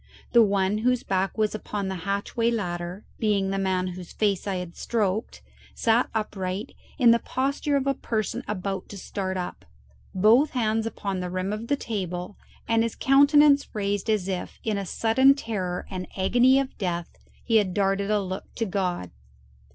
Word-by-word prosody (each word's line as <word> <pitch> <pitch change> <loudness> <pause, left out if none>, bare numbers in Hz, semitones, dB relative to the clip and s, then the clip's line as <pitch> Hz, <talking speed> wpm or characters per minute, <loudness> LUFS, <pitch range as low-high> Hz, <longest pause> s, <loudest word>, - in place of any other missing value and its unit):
The 235 - +7
one 200 -1 +2
whose 250 +2 +1
back 190 +2 -1
was 215 -1 +1
upon 210 -2 -4
the 190 - -2 0.2
hatchway 205 +4 0
ladder, 180 -3 -3
being 200 -3 +1
the 195 - -1
man 185 -1 0
whose 180 -1 -8
face 205 -2 0
I 195 - -1
had 180 -2 -5
stroked, 215 -2 -2 0.3
sat 230 +2 +2
upright, 200 0 -3 0.2
in 245 -5 +6
the 235 - +4
posture 280 +4 -1
of 270 - -1
a 275 - +2
person 220 -5 -3
about 195 -2 -3
to 200 - -8
start 190 0 -4
up, 180 -1 -5 0.5
both 225 +10 +5
hands 225 -1 +1
upon 200 -4 -3
the 180 0 -3
rim 185 +2 -2
of 215 +2 -5
the 285 - +2
table, 185 -5 -4 0.3
and 230 0 +3
his 230 -1 -1
countenance 285 +1 +5
raised 205 0 -1
as 210 -4 +1
if, 185 -2 -4
in 215 -2 -1
a 195 - -5
sudden 260 +8 +4
terror 190 -9 -3
and 185 -1 -4
agony 245 +7 +4
of 275 -1 -3
death, 175 -4 -3 0.2
he 225 -2 +3
had 190 -4 +1
darted 195 0 +1
a 210 -1 +3
look 185 0 -6
to 230 - -1
God. 180 - -2
205 Hz, 175 wpm, -26 LUFS, 185-230 Hz, 0.5 s, The